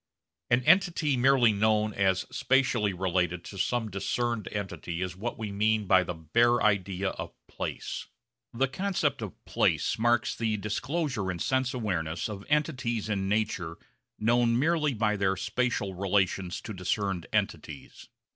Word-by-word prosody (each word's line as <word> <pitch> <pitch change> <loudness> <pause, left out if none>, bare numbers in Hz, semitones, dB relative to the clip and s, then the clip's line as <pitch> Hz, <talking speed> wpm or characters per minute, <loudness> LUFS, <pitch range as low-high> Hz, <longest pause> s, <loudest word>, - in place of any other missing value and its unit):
An 120 +1 +3
entity 165 -3 +3
merely 125 -2 +5
known 110 +1 +2
as 95 -1 +1
spatially 125 -6 +2
related 90 -1 -1
to 100 - -9
some 115 +2 0
discerned 120 +3 -2
entity 95 -4 -4
is 90 -1 -4
what 115 +6 -4
we 110 -2 -4
mean 105 +1 +1
by 95 -1 +5
the 90 -1 -5
bare 115 +10 +3
idea 100 -2 +1
of - - -7
'place.' - - -5 0.4
The 135 +3 +1
concept 145 -3 -1
of 105 -5 -8
place - - +1
marks 120 0 +2
the 110 -2 -1
disclosure 130 - -2
in 90 - -2
sense 130 +7 0
awareness 85 -8 -2
of 100 -2 -6
entities 125 -8 0
in 95 -2 -1
nature 100 -6 -1 0.4
known 115 +1 +3
merely 150 0 +1
by 105 -1 +1
their 95 -1 +1
spatial 100 -1 -1
relations 95 -1 0
to 110 - -7
discerned 95 -1 -2
entities. 70 - -3
105 Hz, 145 wpm, -28 LUFS, 95-120 Hz, 0.4 s, merely